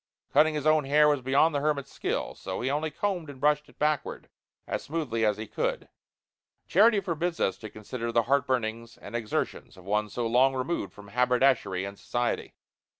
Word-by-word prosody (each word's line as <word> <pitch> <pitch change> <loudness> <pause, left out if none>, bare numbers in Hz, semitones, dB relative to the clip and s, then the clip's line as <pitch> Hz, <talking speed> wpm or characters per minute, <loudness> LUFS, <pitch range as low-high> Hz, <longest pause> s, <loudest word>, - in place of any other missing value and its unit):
Cutting 155 0 +5
his 150 -1 -3
own 155 -2 +4
hair 150 +2 +5
was 145 -3 +2
beyond 140 +5 +3
the 145 - +1
hermit's 140 -2 -1
skill. - - -2
So - - -5
he 130 +3 0
only 155 +2 -1
combed 175 0 -2
and 140 -2 -10
brushed 150 +1 +2
it - - -21
backward 150 -1 -1 0.4
as - - -3
smoothly 140 -8 -2
as 105 -2 +2
he 110 - -5
could. - - -3 0.8
Charity 215 +3 +5
forbids 170 -2 -2
us 95 - +1
to 110 - -8
consider 115 +3 -5
the 115 0 +3
heartburnings 120 -4 -1
and - - -9
exertions 110 -4 -3
of 95 - -14
one 105 +1 0
so 120 +3 -3
long 130 +4 +3
removed 130 -4 -2
from 100 -1 -14
haberdashery 125 -5 +2
and 100 0 -8
society. 120 0 -2
130 Hz, 185 wpm, -28 LUFS, 115-150 Hz, 0.8 s, Cutting